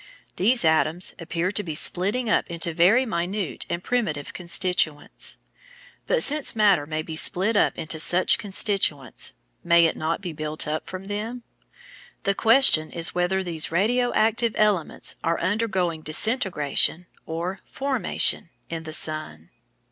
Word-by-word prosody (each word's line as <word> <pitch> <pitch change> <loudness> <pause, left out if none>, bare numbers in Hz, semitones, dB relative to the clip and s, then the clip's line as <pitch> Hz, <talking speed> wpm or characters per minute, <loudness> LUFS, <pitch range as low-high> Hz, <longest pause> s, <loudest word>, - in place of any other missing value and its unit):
These 230 +2 +4
atoms 160 +2 +1
appear 170 +2 -3
to 210 - -2
be 165 -6 -6
splitting 200 +10 +1
up 220 - 0
into 170 0 -2
very 195 +11 +3
minute 190 - -4
and 170 +1 -4
primitive 185 -13 -2
constituents. 170 -4 -1 0.7
But - - +2
since 295 -3 +2
matter 200 -9 +3
may 155 0 -3
be 160 0 -7
split 190 +7 +2
up - - +2
into 160 0 -5
such 175 +3 +3
constituents, 190 - -1 0.3
may 170 0 +4
it 165 - 0
not 160 +1 -2
be 180 -4 -7
built 155 0 -3
up 155 +1 -4
from 185 +1 -8
them? 220 +4 -5 0.8
The 200 - +1
question 225 -8 +4
is 165 -1 +1
whether 180 +2 0
these 165 -4 -2
"radio 240 +8 +1
active" 225 +1 +1
elements 210 -6 0
are 165 +1 0
undergoing 185 -4 -1
disintegration, 170 - +2 0.2
or 175 +4 -4
formation, 265 -9 0 0.2
in 165 -1 -6
the 155 - -5
sun. 155 - -1
180 Hz, 140 wpm, -23 LUFS, 160-210 Hz, 0.8 s, These